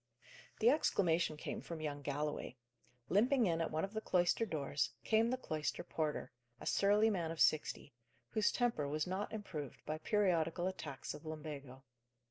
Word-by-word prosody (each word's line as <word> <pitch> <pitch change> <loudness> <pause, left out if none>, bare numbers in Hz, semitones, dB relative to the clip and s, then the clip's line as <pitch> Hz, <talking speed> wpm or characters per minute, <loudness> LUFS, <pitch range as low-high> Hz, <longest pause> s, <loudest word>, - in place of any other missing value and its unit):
The 235 +3 +7
exclamation 170 - +2
came - - -4
from 170 -2 -6
young 145 -2 -3
Galloway. 145 -2 -3 0.5
Limping 240 +5 +4
in 165 -3 +1
at 165 - 0
one 155 +1 -1
of 195 - -11
the 220 - -2
cloister 180 +5 +2
doors, 140 -6 -1
came 225 +1 +3
the 255 - 0
cloister 155 -10 -2
porter, 155 -5 -2 0.3
a - - -9
surly 210 +2 +4
man 170 -5 -1
of 165 -1 -5
sixty, 150 -2 +2 0.4
whose 215 -2 +2
temper 235 - +1
was 150 +2 -1
not 190 +3 -2
improved 180 - -6
by 155 0 -3
periodical 175 -4 +2
attacks 150 -8 -4
of 150 - -10
lumbago. 145 -4 -7
165 Hz, 160 wpm, -37 LUFS, 150-205 Hz, 0.5 s, The